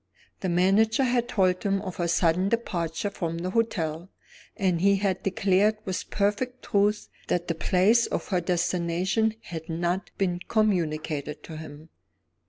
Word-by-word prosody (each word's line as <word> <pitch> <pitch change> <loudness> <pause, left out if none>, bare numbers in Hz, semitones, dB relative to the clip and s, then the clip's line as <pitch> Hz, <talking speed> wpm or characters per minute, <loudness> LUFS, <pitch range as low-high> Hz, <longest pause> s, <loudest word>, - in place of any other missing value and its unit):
The 185 - -2
manager 195 +8 +3
had 240 -1 +1
told 185 -4 +1
him 195 -1 +1
of 185 -3 -6
her 175 - 0
sudden 175 +2 +2
departure 195 -5 -2
from 165 -4 -3
the 180 +2 -3
hotel, 175 -6 -1 0.5
and 180 -4 +1
had 195 -1 +2
declared 195 +2 +2
with 190 -1 -4
perfect 210 +5 -1
truth 205 +1 +1 0.2
that 175 0 -1
the 165 - 0
place 190 +8 +3
of - - -3
her 185 -3 +1
destination 180 +4 0
had 160 -1 -7
not 175 +3 -1
been 180 -3 0
communicated 155 -8 0
to 160 - -8
him. 155 0 -10
185 Hz, 145 wpm, -26 LUFS, 170-205 Hz, 0.5 s, manager